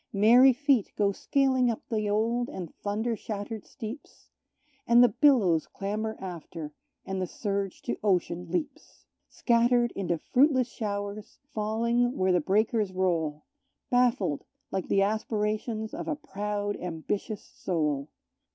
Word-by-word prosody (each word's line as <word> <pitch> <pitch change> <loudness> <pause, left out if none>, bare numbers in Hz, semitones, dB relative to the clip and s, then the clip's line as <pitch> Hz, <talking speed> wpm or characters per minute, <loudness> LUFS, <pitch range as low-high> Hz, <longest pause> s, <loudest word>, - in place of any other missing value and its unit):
Merry 235 +6 +7
feet 265 -4 +1
go 200 -1 +2
scaling 260 +3 +2
up 230 - -4
the 215 -3 -1
old 230 +3 +1
and 175 -4 -7
thunder 220 +3 -2
shattered 210 0 -6
steeps, 245 +2 -9 0.6
And 235 +1 +7
the 245 - +6
billows 210 - +3
clamber 215 +2 -3
after, 165 -4 -7 0.3
and 190 -1 -3
the 185 - -1
surge 200 0 -3
to - - -3
ocean 180 -3 0
leaps, 185 - -5 0.2
Scattered 240 0 +2
into 175 -3 -2
fruitless 260 - +3
showers, 205 -1 -5 0.2
falling 235 +4 0
where 185 0 +2
the 180 -1 +3
breakers 210 +3 +1
roll, 165 -5 -1 0.5
Baffled 240 - +2 0.3
like 190 -1 -2
the 195 - +3
aspirations 215 +1 -1
of - - -5
a 310 - 0
proud 205 -7 -3
ambitious 180 +5 -4
soul. 150 -5 -2
210 Hz, 130 wpm, -28 LUFS, 190-235 Hz, 0.6 s, Merry